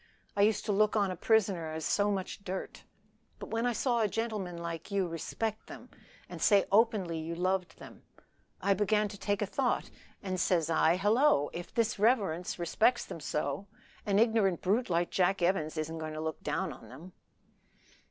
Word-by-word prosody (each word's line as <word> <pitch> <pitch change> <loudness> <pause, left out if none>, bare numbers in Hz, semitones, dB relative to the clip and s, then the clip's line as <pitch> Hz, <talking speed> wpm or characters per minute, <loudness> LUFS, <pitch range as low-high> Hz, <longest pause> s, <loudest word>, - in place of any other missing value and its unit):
I 200 - +2
used 215 +1 +2
to 210 - 0
look 210 +2 +2
on 200 -3 +2
a - - -4
prisoner 190 -5 +1
as 160 0 -4
so 205 0 +2
much 195 0 -3
dirt. 190 0 -6 0.5
But - - -9
when 230 +2 0
I 245 - +1
saw 240 0 +1
a 215 - +3
gentleman 210 -5 -3
like 170 0 -6
you 200 -3 0
respect 215 +6 -4
them, - - -11 0.4
and - - -9
say 200 -2 +5
openly 200 -6 +2
you 165 +1 -4
loved 185 +1 -1
them, - - -13 0.6
I 200 - +4
began 210 +1 +1
to 205 - -9
take 205 0 0
a - - +1
thought, 250 +5 -1 0.3
and 185 -2 -2
says 170 -3 +1
I, 160 +1 +4
Hallo! 210 - +3
if 175 0 -8
his 230 -3 +1
reverence 200 -7 +1
respects 220 +8 +2
them - - -8
so, 150 +5 -3 0.4
an 200 -2 +1
ignorant 215 -5 +2
brute 215 +6 +1
like 170 0 0
Jack 185 0 +1
Evans 165 -3 0
isn't 160 +1 -3
to 155 -1 -5
look 160 +2 -4
down 190 -4 -2
on 115 -3 -14
them." 160 +9 -12
190 Hz, 180 wpm, -31 LUFS, 170-215 Hz, 0.6 s, say